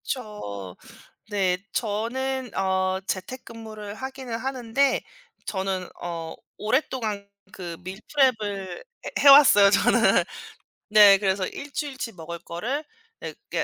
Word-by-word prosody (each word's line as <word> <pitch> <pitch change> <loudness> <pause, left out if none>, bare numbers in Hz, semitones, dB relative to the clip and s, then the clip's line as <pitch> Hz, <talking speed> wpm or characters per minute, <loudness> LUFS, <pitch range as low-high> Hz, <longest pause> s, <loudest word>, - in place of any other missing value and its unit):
그쵸. 100 - -6 0.6
네 190 -3 +1 0.2
저는 250 +4 -2
어 190 0 0
재택근무를 215 0 -6
하기는 260 -1 -6
하는데 260 +1 0 0.5
저는 190 -2 -2
어 165 -2 -5 0.2
오랫동안 220 -4 -1 0.2
그 175 -2 -7
밀프렙을 205 -2 -1 0.3
해 - - -4
해 285 - +7
왔어요 270 -8 +9
저는. 200 -1 +4 0.7
네 205 -2 +8
그래서 190 -1 0
1 285 0 -8
주일치 270 -6 -4
먹을 170 -1 -8
거를 240 - -4 0.4
네 - - -6
그게 - - -4
210 Hz, 220 characters per minute, -25 LUFS, 190-260 Hz, 0.7 s, 왔어요